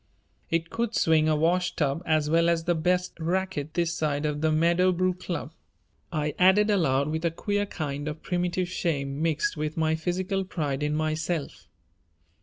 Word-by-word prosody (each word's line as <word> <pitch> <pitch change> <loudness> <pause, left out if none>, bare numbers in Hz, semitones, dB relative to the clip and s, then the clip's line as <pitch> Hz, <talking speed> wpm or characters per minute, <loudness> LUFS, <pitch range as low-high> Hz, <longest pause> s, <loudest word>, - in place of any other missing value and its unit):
"It 165 0 -1
could 230 0 -2
swing 155 -1 +3
a 155 - +3
wash 175 +4 +1
tub 145 +1 0
as 155 -2 +2
well 165 +2 +3
as 165 -1 +1
the 175 +1 +2
best 180 +2 0
racquet 170 -3 -2
this 170 -1 +1
side 150 -1 -1
of 150 0 -2
the 155 0 +2
Meadowbrook 180 +3 +2
Club," 170 -4 -4 0.6
I 150 -2 -1
added 200 +4 +5
aloud 140 -7 +2
with 160 +1 -2
a 170 - +3
queer 205 +5 -2
kind 145 -4 -4
of 155 +1 -5
primitive 180 0 -1
shame 145 -6 -2
mixed 160 -1 0
with 155 +1 -3
my 160 0 +2
physical 185 +4 -1
pride 150 -7 -3
in 150 0 0
myself. 155 0 -2
165 Hz, 170 wpm, -27 LUFS, 155-180 Hz, 0.6 s, added